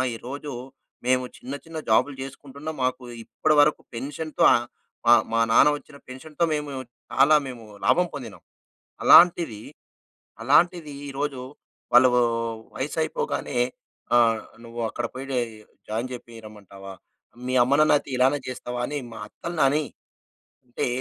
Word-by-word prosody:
ఈరోజు 140 +5 -7 0.5
మేము 125 0 +2
చిన్న 130 +3 -8
చిన్న 160 -1 -8
జాబ్‌లు 130 +6 +3
చేసుకుంటున్నాం. 140 +3 -8
మాకు 130 0 -1 0.2
ఇప్పటివరకు 150 +3 +2
పెన్షన్‌తో 145 +5 -3 0.6
మా 120 - +7 0.2
మా 115 - +2
నాన్న 145 +5 +6
ఒచ్చిన 140 -1 -15
పెన్షన్‌తో 150 +6 -5
మేము 150 -1 -3 0.4
చాలా 140 +3 +5
మేము 120 -3 -9 0.2
లాభం 180 0 +3
పొందినాం. 115 -11 -8 0.6
అలాంటిది, 170 -11 +6 0.8
అలాంటిది 160 +3 +3 0.2
ఈరోజు 140 -1 -3 0.5
వాళ్ళూ 125 +1 +7 0.7
వయసైపోగానే 145 -2 -2 0.6
ఆహ్, 115 -2 +4 0.2
నువ్వక్కడ 115 0 -4
పోయి 135 +1 -7 0.6
జాయిన్ 115 +4 -2
చేపి 120 -1 -9
రమ్మంటావా? 100 -2 -11 0.5
మీ 130 - -2
అమ్మ 130 - +1
నాన్న 155 - +5
అయితే - - -9
ఇలానే 135 +3 +3
చేస్తావా 125 -1 -5
అని 145 0 -3
మా 115 - -9
అత్తల్నని 150 0 0 0.8
అంటే 120 - -2
135 Hz, 115 wpm, -24 LUFS, 120-150 Hz, 0.8 s, మా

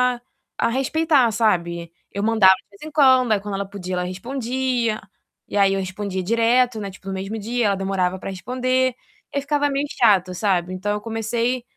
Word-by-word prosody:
a 240 - -14 0.4
a 230 - +2
respeitar, 270 0 +2
sabe. 170 -6 0 0.2
Eu 200 +1 -3
mandava 215 -4 +6
de - - -18
vez 200 - -20
em 310 - -7
quando, 260 -5 +5
aí 205 - +3
quando 205 0 -6
ela 200 0 -2
podia, 185 -2 -6
ela 180 0 0
respondia, 240 +3 -2 0.5
e - - -7
aí 195 -1 +4
eu 195 - 0
respondia 190 0 -4
direto, 230 +2 +2
né, 200 -1 -4
tipo, 195 0 -14
no 195 - -3
mesmo 195 +3 -4
dia, 230 +2 0
ela 200 - +2
demorava 190 -1 -1
pra 190 - -6
responder, 255 +5 0 0.4
aí 280 - +1
ficava 290 0 +1
meio 280 +1 -1
chato, 190 -6 +4
sabe. 185 -2 0
Então, 205 +3 -2
eu 210 - -3
comecei 230 +3 -1
215 Hz, 195 wpm, -22 LUFS, 190-250 Hz, 0.5 s, mandava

